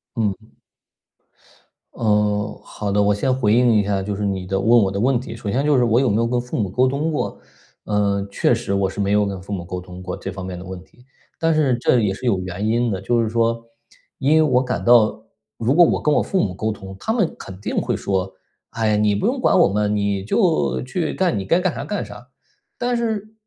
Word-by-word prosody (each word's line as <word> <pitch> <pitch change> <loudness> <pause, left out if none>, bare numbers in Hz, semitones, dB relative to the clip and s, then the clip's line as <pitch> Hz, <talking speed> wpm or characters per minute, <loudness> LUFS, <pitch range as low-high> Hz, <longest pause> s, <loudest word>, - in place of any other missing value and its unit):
嗯。 110 -4 +1 1.6
嗯， 105 -1 0
好 105 -2 -5
的， 105 +1 +2
我 100 0 +3
先 130 +5 0
回 125 -5 +1
应 120 +2 +4
一 105 -1 +3
下， 100 -1 -1
就 100 +1 -3
是 105 - -4
你 95 -2 -2
的 95 +1 -1
问 115 +5 +5
我 95 - 0
的 100 - -3
问 125 +2 +2
题。 120 -2 -8
首 115 -3 -5
先 130 +7 0
就 150 -1 +3
是 125 - +3
我 120 0 +3
有 135 - +2
没 105 - +1
有 115 +1 +1
跟 120 +1 0
父 125 0 -6
母 100 -4 0
沟 125 +7 +2
通 145 +5 -1
过， 150 - -3 0.5
呃， 100 -1 0
确 110 - +2
实， 115 -4 -2
我 100 -1 +1
是 95 - -8
没 100 0 0
有 105 0 +3
跟 100 -2 -5
父 100 - -11
母 90 -4 -4
沟 90 0 -5
通 90 0 -11
过 90 - -4
这 95 - -6
方 95 -1 -7
面 90 -1 -6
的 90 - -8
问 95 0 -8
题， 125 - -24 0.4
但 165 0 +2
是 145 -5 +2
这 125 - +3
也 105 -4 +1
是 125 +6 -5
有 105 -5 +2
原 95 +3 -4
因 120 +1 +1
的， 95 -1 -3
就 115 +4 +1
是 110 - -1
说， 115 0 0 0.5
因 140 +3 +3
为 160 - +5
我 130 -4 +2
感 125 - -3
到 110 -2 +4 0.3
如 115 +4 +1
果 175 +3 +7
我 - - +2
跟 150 - +2
我 - - +3
父 190 - -1
母 95 - -2
沟 110 +4 -2
通， 95 -2 -9
他 - - -2
们 220 -7 0
肯 95 -1 -9
定 100 - -4
会 - - -1
说 95 -1 -2 0.3
“哎 115 -1 -1
呀， 105 - +2
你 105 -1 +2
不 100 - -2
用 - - 0
管 - - +3
我 - - +6
们， 105 +1 0
你 100 -1 -1
就 85 - +1
去 - - -2
干 - - 0
你 - - -3
该 165 - +2
干 185 -2 0
哈 - - -5
干 205 - -3
啥”。 105 +4 -12 0.5
但 245 0 -1
是， 220 -2 -2
105 Hz, 265 characters per minute, -21 LUFS, 100-125 Hz, 1.6 s, 果